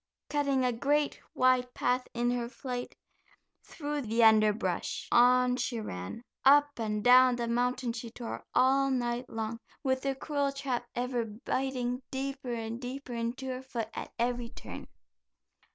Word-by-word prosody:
Cutting 280 -3 +2
a 250 - +2
great, 285 +5 +1
wide 255 -1 +3
path 250 +1 0
in 240 +1 +1
her 240 -1 -2
flight 250 -1 -5 0.7
through 295 -1 -4
the 230 -1 +1
underbrush 215 -4 +3
on 250 +1 +5
she 240 -2 -2
ran. 90 - -6 0.2
Up 290 0 +5
and 210 -2 -1
down 250 0 +7
the 240 -1 -2
mountain 245 +1 0
she 235 0 -6
tore, 235 0 -6
all 270 +1 +4
night 245 -1 -1
long, 225 0 -4 0.2
with 260 -1 +1
the 275 0 -1
cruel 285 0 -1
trap 265 -3 -3
ever 245 -1 -1
biting 250 +3 -2
deeper 270 -1 -4
and 230 0 -4
deeper 255 0 -6
into 235 +3 -3
her 255 -1 -3
foot 235 -4 -4
at - - -6
every 240 0 -1
turn. - - -9
250 Hz, 150 wpm, -30 LUFS, 235-265 Hz, 0.7 s, down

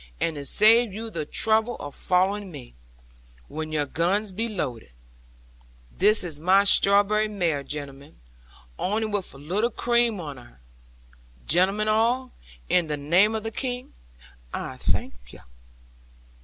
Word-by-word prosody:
And 165 - -1
to 145 -1 -5
save 225 - +5
you 225 +3 -7
the 155 -6 -5
trouble 220 +5 +1
of 145 -1 -8
following 195 +2 0
me, - - -11 0.7
when 155 0 -6
your 150 -2 0
guns 185 +8 -1
be 225 +5 -2
loaded 130 - -5 1.1
this 210 +2 +3
is 160 -5 -4
my 190 +5 +4
strawberry 205 +2 +5
mare, 175 -8 -1
gentlemen, 140 0 -8 0.6
only 215 +4 -1
with 205 -3 -3
a - - -11
little 185 +11 -1
cream 235 -2 +1
on 145 -5 -7
her. 120 - -17 0.9
Gentlemen 195 +6 +2
all, 235 +4 +1 0.4
in 175 -3 +1
the 150 -1 -3
name 180 +10 +2
of 220 - -4
the 225 - -5
King, 250 +1 -5 0.6
I - - -6
thank - - -2 0.2
you." - - -14
195 Hz, 140 wpm, -24 LUFS, 155-220 Hz, 1.1 s, save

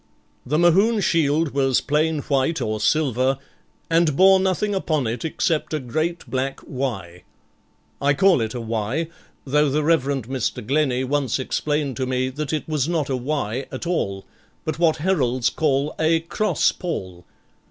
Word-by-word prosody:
The 150 +4 +1
Mohune 195 +7 +4
shield 160 -3 +2
was 135 -2 +2
plain 155 +1 0
white 140 +4 0
or 110 0 -2
silver, 130 +1 +1 0.5
and 165 -3 +2
bore 190 +3 +6
nothing 190 +2 0
upon 155 -8 0
it 115 +2 -3
except 160 -1 -1
a - - -1
great 155 +7 -2
black 135 +1 -2
'Y. 100 -10 -5 0.8
I 140 0 +3
call 185 -3 +4
it 110 +2 -3
a - - -3
'Y', 115 +8 -2 0.4
though 150 +2 +2
the 150 +3 0
Reverend 140 -6 +1
Mr. 130 -4 -3
Glennie 135 -1 +1
once 140 0 0
explained 145 +1 -2
to 130 -1 -2
me 130 0 0
that 145 +2 -4
it 155 -2 -2
was 155 -1 0
not 155 -5 -1
a - - +1
'Y' 130 -2 -2
at 130 +6 -6
all, 100 - -2 0.4
but 155 0 -3
what 160 -2 +3
heralds 135 -8 +1
call 145 -1 0
a 160 +1 +3
_cross 210 +6 0
pall. 95 - -5
145 Hz, 160 wpm, -22 LUFS, 130-160 Hz, 0.8 s, bore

